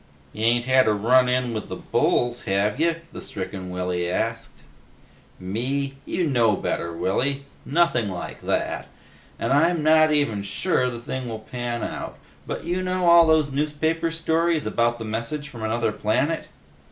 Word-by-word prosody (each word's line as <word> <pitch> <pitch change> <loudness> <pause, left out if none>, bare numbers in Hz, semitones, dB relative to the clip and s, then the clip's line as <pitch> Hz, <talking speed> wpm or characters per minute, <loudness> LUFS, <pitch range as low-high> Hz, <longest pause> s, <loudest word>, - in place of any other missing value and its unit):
"Ya 110 +1 -2
ain't 120 0 +2
had 130 -1 +4
a 110 - +4
run 125 +5 +4
in 125 -1 0
with 110 - -5
the - - -4
bulls, 120 0 0
have 100 +5 0
ya?" 165 +1 +3 0.2
the - - -7
stricken 95 -1 -5
Willy 90 -1 -2
asked. 115 -6 -3 0.8
"Me? 130 +9 -2
You 175 0 0
know 120 -7 +3
me - - -8
better, 85 - -1
Willy. 135 +11 -1 0.2
Nothing 140 -8 +2
like 90 -2 -6
that. - - -1 0.5
And - - 0
I'm 165 +2 +3
not 155 0 +5
even 145 -9 +1
sure 125 - 0
the 120 - -6
thing 125 +1 -5
will 110 - -4
pan 120 +2 -4
out, - - -5 0.3
but - - -4
you 180 +2 -1
know 185 -1 0
all 170 -1 +8
those 155 -3 +3
newspaper 155 +3 0
stories 165 0 0
about 120 0 +1
messages 115 +7 -3
from 120 -6 -9
another 110 0 0
planet?" 130 +10 0
125 Hz, 165 wpm, -24 LUFS, 110-155 Hz, 0.8 s, all